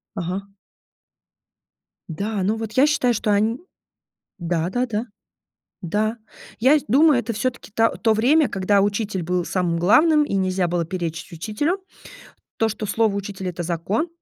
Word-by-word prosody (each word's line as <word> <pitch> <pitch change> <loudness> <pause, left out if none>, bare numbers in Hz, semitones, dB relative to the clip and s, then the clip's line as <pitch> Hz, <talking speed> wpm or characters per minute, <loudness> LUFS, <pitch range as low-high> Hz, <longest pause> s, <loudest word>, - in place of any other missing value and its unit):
Ага. 195 +2 -4 1.6
Да, 200 +5 -3
ну, 210 +4 +1
вот 220 -1 -5
я 265 +5 +4
считаю, 250 -5 +2
что 210 0 0
они, 215 +4 +1 0.8
да-да-да. 200 +8 -1 0.8
Да. 215 +6 -1 0.4
Я 270 +6 +5
сь - - -10
думаю, 290 +3 +5
это 230 +1 -4
всё-таки 240 -1 -4
та 225 0 +4
то 225 - +2
время, 270 +8 +3
когда 195 +1 +2
учитель 205 -2 -1
был 180 +1 -1
самым 175 -3 0
главным 300 - +5
и 290 - -4
нельзя 185 -2 0
было 170 0 0
перечить 170 -2 -5
учителю. 215 - -2 0.8
То, 225 - +1
что 215 0 -5
слово 215 0 +1
учителя- 200 -2 -4
это 175 0 -5
закон. 175 - -1
205 Hz, 145 wpm, -22 LUFS, 185-235 Hz, 1.6 s, Я